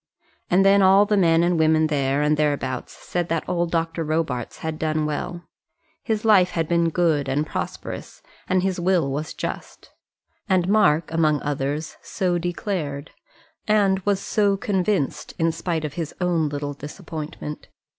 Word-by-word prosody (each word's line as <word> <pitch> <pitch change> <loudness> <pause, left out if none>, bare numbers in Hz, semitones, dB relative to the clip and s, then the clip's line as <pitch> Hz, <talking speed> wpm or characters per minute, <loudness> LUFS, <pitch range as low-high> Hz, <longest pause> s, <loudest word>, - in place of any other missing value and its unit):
And 190 +2 +4
then 200 0 +6
all 195 +2 +6
men 175 -6 +3
and 175 -1 +2
women 160 0 +4
there 140 -2 +1
and 150 +1 +3
thereabouts 145 -3 -1
said 175 -1 -4
that 165 -1 -1
old 175 -1 0
Dr. 165 0 -1
Robarts 155 -6 -2
had 160 -1 -3
done 155 -1 0
well. 170 +3 -4 0.6
His 220 -1 -2
life 195 -5 +5
had 165 -3 -2
been 170 0 +2
good 160 -5 +1
and 145 +3 0
prosperous, - - -6 0.3
and 185 0 +2
his 190 -1 -1
will 175 -5 +1
was 150 +3 -4
just. - - -6 0.6
And 185 -2 +2
Mark, 180 -7 +3
among 155 -2 +2
others, 145 +2 -3
so 180 -2 -1
declared, 170 -5 -3 0.6
and 200 -3 +3
was 195 0 0
so 200 -1 +1
convinced 190 -6 -1
in 165 0 +2
spite 165 -1 -2
of 145 - -5
his 160 -1 -5
own 170 -4 +1
little 145 0 -4
disappointment. 150 0 -7
165 Hz, 155 wpm, -23 LUFS, 150-185 Hz, 0.6 s, then